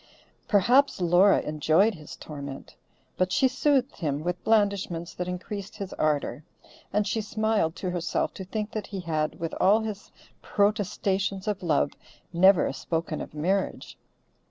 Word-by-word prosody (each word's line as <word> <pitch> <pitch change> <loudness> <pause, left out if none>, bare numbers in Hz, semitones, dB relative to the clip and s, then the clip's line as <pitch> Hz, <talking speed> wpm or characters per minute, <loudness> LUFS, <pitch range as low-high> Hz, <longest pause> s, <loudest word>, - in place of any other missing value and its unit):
Perhaps 245 +6 +4
Laura 180 +3 +5
enjoyed 155 +8 +2
his 155 -5 -10
torment, 140 -2 -8 0.4
but 185 0 +1
she 265 - +4
soothed 270 0 +1
him 150 -3 -2
with 180 +1 -3
blandishments 200 -6 +1
that 180 - -4
increased 200 +3 -6
his 200 -3 -6
ardor, 150 -3 -1 0.5
and 210 +1 +1
she 220 - -1
smiled 215 -5 0
to 185 - -3
herself 175 -2 -1
to 190 - -7
think 210 +3 -4
that 215 -2 -4
he 195 -3 -5
had, 155 -3 -2
with 165 -1 -3
all 205 +4 +5
his 215 -2 -6 0.3
protestations 200 -1 0
of 205 -2 -1
love, 150 -5 +1 0.4
never 185 -3 +5
spoken 165 +1 -3
of - - -8
marriage. 185 +6 -1
190 Hz, 145 wpm, -27 LUFS, 165-210 Hz, 0.5 s, Laura